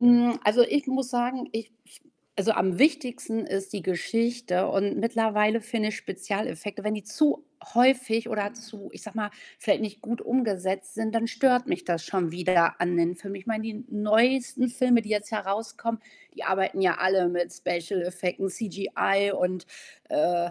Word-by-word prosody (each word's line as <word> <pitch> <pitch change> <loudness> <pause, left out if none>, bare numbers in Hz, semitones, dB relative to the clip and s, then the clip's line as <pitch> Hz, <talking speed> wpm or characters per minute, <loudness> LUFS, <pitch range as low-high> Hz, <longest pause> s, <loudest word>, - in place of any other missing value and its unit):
Hm, 240 0 +6
also, 215 +4 +6
ich 285 +4 +1
muss 260 -1 -1
sagen, 250 +2 -1
ich 225 0 -5
ich - - -18 0.4
also, 200 +3 +2
am 190 -4 +1
wichtigsten 255 -6 +1
ist 195 0 -3
die 205 -3 -4
Geschichte. 225 +2 0
Und 200 +1 0
mittlerweile 225 -1 +2
finde 220 -1 -1
ich - - -5
Spezialeffekte, 200 -1 -4
wenn 210 +1 -1
die 210 -2 -6
zu 295 +8 +1 0.3
häufig 245 -2 +4
oder 205 -3 -2
zu 220 -4 -12
ich - - -12
sage 215 0 -10
mal, 210 -2 -2 0.3
vielleicht 220 -3 +2
nicht 210 0 -5
gut 235 +1 -4
umgesetzt 195 -6 -1
sind, 220 0 -3
dann 230 0 +1
stört 250 +2 +3
mich 345 - -2
das 170 -2 -1
schon 175 -3 -1
wieder 175 -1 +2
an 175 0 +1
den 170 +1 +2
Film. 195 +3 -8
Ich 190 - -11
meine, 220 -1 -1
die 225 +2 -6
neuesten 245 +4 +2
Filme, 245 -1 +3
die 215 -1 -9
jetzt 210 -1 -1
heraus 215 0 -3
kommen, 230 -1 -3 0.3
die - - -8
arbeiten 190 0 0
ja 185 -3 +3
alle 190 -1 +3
mit 175 0 -1
Special 175 +1 -2
Effekten, 180 +2 -2
CGI 200 -1 0
und, 180 0 -1 0.4
äh, 175 - +1
215 Hz, 175 wpm, -27 LUFS, 190-240 Hz, 0.4 s, Hm